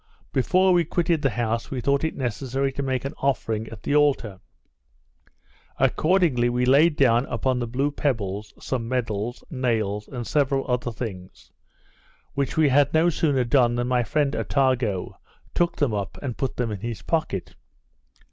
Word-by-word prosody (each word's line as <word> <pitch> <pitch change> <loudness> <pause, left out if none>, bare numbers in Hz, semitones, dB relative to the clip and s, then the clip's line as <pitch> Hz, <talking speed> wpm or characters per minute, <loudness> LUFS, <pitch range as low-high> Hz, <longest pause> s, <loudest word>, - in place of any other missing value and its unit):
Before 185 +8 +3
we 175 -1 +4
quitted 165 0 0
the 135 - +2
house 115 0 -2
we 130 - -3
thought 140 +4 +1
it 160 - -1
necessary 135 +2 -2
to 140 - -4
make 130 -1 -2
an 135 - -3
offering 115 -5 -1
at 110 -2 -11
the 145 - 0
altar. 135 -10 +2 1.4
Accordingly 155 -9 +2
we 125 +1 0
laid 145 +5 +5
down 125 -2 +3
upon 130 -1 0
the 120 - -2
blue 135 +5 0
pebbles, 105 -8 -2
some 120 -3 -3
medals, 120 -2 -2
nails, 110 -6 -1
and 120 -3 -6
several 135 -1 +1
other 125 -1 -1
things, 90 - -8 0.8
which 140 +1 -2
we 155 -2 +5
had 145 +1 +4
no 165 +2 +4
sooner 145 -6 +1
done 120 -1 +3
than 120 +1 -1
my 125 -1 +2
friend 140 +5 0
Attago 130 -9 0 0.3
took 175 0 +1
them 140 -7 0
up, 100 -2 -3
and 125 -4 -3
put 135 - -3
them 120 -3 -1
in 105 - -4
his 115 +1 -5
pocket. 155 - -2
130 Hz, 165 wpm, -24 LUFS, 115-140 Hz, 1.4 s, laid